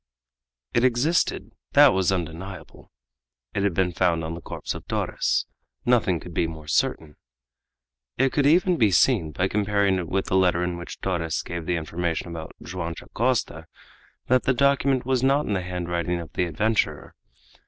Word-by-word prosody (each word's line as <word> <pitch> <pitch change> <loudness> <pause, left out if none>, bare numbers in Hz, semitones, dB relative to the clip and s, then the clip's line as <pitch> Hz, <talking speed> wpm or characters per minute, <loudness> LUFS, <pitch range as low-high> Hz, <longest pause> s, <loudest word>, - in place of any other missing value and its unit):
It 120 - +2
existed, 130 +7 +1 0.2
that - - +7
was 95 0 +2
undeniable; 85 0 -6 0.6
it 100 - -1
had 100 -4 0
been 90 0 +1
found 85 -2 +1
on 80 +1 -4
the 85 - -7
corpse - - -5
of - - -10
Torres, - - 0 0.4
nothing 110 -8 +2
could 85 - -10
be 85 - +1
more 80 -2 -9
certain. 75 +1 -1 1.0
It 135 - +2
could 145 -1 +2
even 175 +3 +4
be 110 -4 +4
seen, 90 - +3
by 90 +6 0
comparing 100 -2 +1
it 85 - -4
with 95 0 0
the - - -1
letter 90 -2 +3
in 90 0 -2
which 85 - -8
Torres 85 -4 -1
gave 85 -2 -6
the 90 - +1
information 85 +1 -3
about 80 -2 -7
Joam 85 -2 -5
Dacosta, 115 -10 -2 0.6
that 130 0 +3
the 130 - +2
document 140 -1 +2
was 130 -1 +1
not 140 +3 +3
in 105 - -1
the 95 - 0
handwriting 90 -1 -2
of 85 - -9
the 90 - 0
adventurer. 105 +7 -1
90 Hz, 170 wpm, -25 LUFS, 85-120 Hz, 1.0 s, that